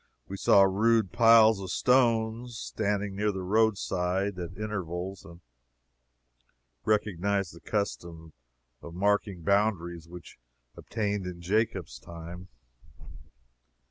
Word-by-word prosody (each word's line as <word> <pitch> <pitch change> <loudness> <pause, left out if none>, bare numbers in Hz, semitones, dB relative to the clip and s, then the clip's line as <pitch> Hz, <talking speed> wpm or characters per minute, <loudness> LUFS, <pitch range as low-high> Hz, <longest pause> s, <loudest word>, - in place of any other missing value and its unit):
We 100 - -6
saw 100 0 +5
rude 110 +2 +2
piles 115 -2 +6
of 95 - -6
stones 115 0 +1
standing 105 -3 -2
near 105 +1 0
the 95 -1 -5
roadside, 95 -2 0
at 90 +1 -7
intervals, 95 -3 -5
and 85 +1 -14 1.4
recognized 100 -3 0
the 85 - -13
custom 85 -6 -4 0.5
of 85 - -10
marking 100 -2 0
boundaries 85 -4 0
which 85 -6 -12 0.4
obtained 105 -4 -3
in 90 -1 -7
Jacob's 95 0 -1
time. 85 +2 -10
100 Hz, 105 wpm, -28 LUFS, 90-110 Hz, 1.4 s, piles